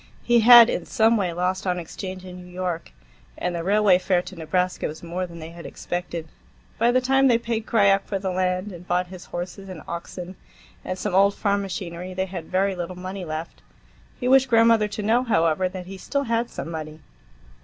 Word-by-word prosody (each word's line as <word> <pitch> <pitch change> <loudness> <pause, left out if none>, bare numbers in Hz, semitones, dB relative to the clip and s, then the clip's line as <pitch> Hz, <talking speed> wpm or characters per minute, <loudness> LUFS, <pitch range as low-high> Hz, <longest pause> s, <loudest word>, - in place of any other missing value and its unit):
He 240 -1 +4
had 235 0 +10
in - - -3
some 225 +1 +3
way 190 -5 0
lost 185 +2 -2
on 180 -1 +1
exchange 185 +2 -7
in 180 -1 -9
New 180 0 -12
York, 180 - -4 0.5
and 180 - -2
the 170 -1 -3
railway 200 -1 +4
fare 180 -1 +1
to 185 - -10
Nebraska 180 +3 -1
was 155 +2 -9
more 180 +2 -3
than 170 -1 -11
they 160 0 -8
had 170 0 -11
expected. 175 -2 -5 0.5
By 230 +2 +4
the 250 +1 +4
time 270 +1 +3
they 240 -3 +5
paid 230 -1 -3
Krajiek 200 -3 +3
for 200 - -1
the 190 -1 -3
land, 185 +2 -1
and 175 0 -11
bought 180 0 0
his 185 - -10
horses 185 +3 -6
and 175 -5 -8
oxen 175 +2 -7 0.5
and 185 - -4
some 195 0 -3
old 200 +1 +4
farm 200 -1 0
machinery, 180 -1 -6
they 190 0 0
had 180 -3 -7
very 190 +2 0
little 180 0 -5
money 185 +1 -6
left. 155 +1 -6 0.6
He 250 - -2
wished 265 0 +5
grandmother 230 -2 +5
to 210 0 -5
know, 225 +4 +3
however, 180 -5 +2
that 185 -1 -7
he 190 +1 -9
still 280 +8 -1
had 235 -1 -1
some 165 - -6
money. 155 -1 -7
185 Hz, 210 wpm, -24 LUFS, 175-210 Hz, 0.6 s, had